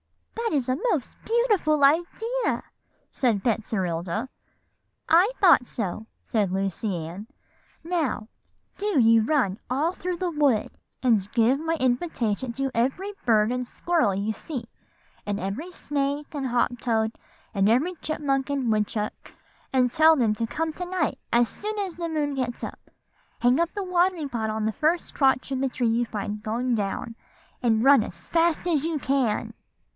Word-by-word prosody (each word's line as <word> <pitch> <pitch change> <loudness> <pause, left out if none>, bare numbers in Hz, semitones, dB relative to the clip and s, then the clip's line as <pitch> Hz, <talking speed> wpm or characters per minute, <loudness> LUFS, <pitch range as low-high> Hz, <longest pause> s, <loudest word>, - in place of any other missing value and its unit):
"'That 455 -9 0
is 255 - -1
a 255 - +1 0.2
most 285 -8 -3
beautiful 420 -11 +2
idea,' 360 - +1 0.5
said 225 -7 +1
Betserilda. 195 -2 -1 0.8
"'I 355 +8 +5
thought 345 -10 +6
so,' 215 0 -4 0.2
said 205 -5 0
Lucy 195 +2 -1
Ann. 190 +6 -8 0.6
'Now, 320 -10 -1 0.5
do 410 -7 +1
you 225 -1 +5
run 225 -7 +1
all 295 +7 +1
through 365 -1 -4
the 360 0 -1
wood, 285 -8 +2 0.3
and 215 -5 +2
give 235 +3 +4
my 325 +1 -1
invitation 250 -4 0
to 270 +1 -2
every 270 - -1
bird 220 -1 +4
and 250 0 -2
squirrel 315 - +1
you 200 +3 -1
see, 255 -1 -6 0.6
and 205 -1 -2
every 210 - -4
snake 285 -2 -2
and 280 -3 -2
hop 245 0 0
toad, 225 -2 0 0.4
and 200 -1 +3
every 280 +11 +2
chipmunk 280 -3 -1
and 270 -5 0
woodchuck, 210 0 -2 0.4
and 255 -2 +3
tell 315 +3 +6
them 225 -5 +3
to 230 +1 -2
come 320 +5 -2
to 360 - -5
night 370 +1 -1
as 235 0 +4
soon 425 - -5
as 385 -4 -3
the 340 -1 -3
moon 300 -2 -1
gets 250 -3 -3
up. - - -8 0.5
Hang 245 +3 +3
up 340 0 +1
the 405 - -3
watering 360 -3 +1
pot 225 -4 -2
on 215 0 -2
the 220 - 0
first 320 +6 0
crotch 265 -1 +2
of 265 -1 -1
the 270 - +1
tree 245 -1 -1
you 230 +2 +2
find 210 -1 -4
going 240 +3 -1
down, 215 +2 -3 0.5
and 225 -3 +2
run 270 -3 +7
as 170 -3 -10
fast 335 0 +1
as 310 -5 +2
you 325 -1 -1
can. 260 -5 0
255 Hz, 160 wpm, -25 LUFS, 220-320 Hz, 0.8 s, run